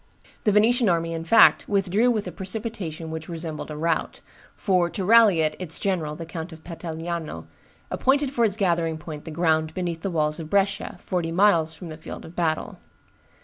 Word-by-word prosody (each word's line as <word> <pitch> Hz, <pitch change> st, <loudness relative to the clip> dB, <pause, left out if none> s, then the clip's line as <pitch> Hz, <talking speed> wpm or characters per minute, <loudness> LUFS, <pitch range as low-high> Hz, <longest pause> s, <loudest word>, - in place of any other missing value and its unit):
The 210 Hz, -, +4 dB
Venetian 225 Hz, +2 st, +4 dB
army, 165 Hz, -1 st, 0 dB
in 165 Hz, 0 st, -4 dB
fact, 225 Hz, +7 st, +6 dB
withdrew 200 Hz, +4 st, +2 dB
with 220 Hz, -4 st, 0 dB
a -, -, -5 dB
precipitation 190 Hz, -5 st, -5 dB
which 160 Hz, 0 st, -6 dB
resembled 165 Hz, -2 st, -5 dB
a 150 Hz, -, -6 dB
rout: 165 Hz, +1 st, -1 dB, 0.4 s
for, 180 Hz, -3 st, +1 dB
to 190 Hz, -, -4 dB
rally 215 Hz, -5 st, +6 dB
it, 155 Hz, -1 st, 0 dB
its 175 Hz, -3 st, -4 dB
general, 165 Hz, -6 st, -1 dB
the 165 Hz, +1 st, -7 dB
Count 165 Hz, +1 st, -6 dB
of 160 Hz, -1 st, -12 dB
Petigliano, 165 Hz, -, -5 dB, 0.5 s
appointed 275 Hz, +1 st, +2 dB
for 240 Hz, -4 st, +1 dB
its 210 Hz, -2 st, +1 dB
gathering 170 Hz, -5 st, +1 dB
point 155 Hz, -2 st, -8 dB
the -, -, -6 dB
ground 160 Hz, -1 st, +1 dB
beneath 175 Hz, -3 st, -3 dB
the 195 Hz, -, -2 dB
walls 155 Hz, -2 st, 0 dB
of 155 Hz, -1 st, -7 dB
Brescia, 200 Hz, +1 st, 0 dB
forty 175 Hz, -3 st, -2 dB
miles 170 Hz, -4 st, +3 dB
from 165 Hz, +1 st, -9 dB
the 155 Hz, -, -8 dB
field 155 Hz, -, -9 dB
of 165 Hz, -, -12 dB
battle. 160 Hz, -2 st, -1 dB
170 Hz, 190 wpm, -24 LUFS, 160-200 Hz, 0.5 s, fact